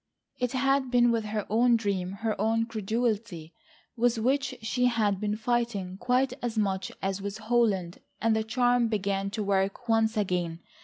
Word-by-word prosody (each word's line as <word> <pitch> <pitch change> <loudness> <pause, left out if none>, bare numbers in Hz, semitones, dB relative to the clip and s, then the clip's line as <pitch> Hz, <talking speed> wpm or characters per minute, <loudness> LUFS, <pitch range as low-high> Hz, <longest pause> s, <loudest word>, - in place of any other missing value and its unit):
It 250 0 -1
had 270 0 +2
been 240 -1 +4
with 225 -2 0
her 210 -1 -3
own 235 +3 +4
dream, 195 -4 -1
her 220 -1 +1
own 225 +1 +2
credulity 215 -6 -2 0.4
with 240 0 +2
which 260 +3 0
she 250 +3 0
had 215 -5 +1
been 210 0 -1
fighting 220 -5 -1
quite 255 +1 +1
as 235 -2 -3
much 195 -3 0
as 195 0 -1
with 200 +1 -4
Holland, 215 -6 0 0.2
and 225 0 +2
the 220 - +1
charm 245 +2 +2
began 200 -2 -1
to 210 +1 -3
work 195 +4 0
once 225 0 +2
again. 180 -4 -1
220 Hz, 165 wpm, -28 LUFS, 200-240 Hz, 0.4 s, been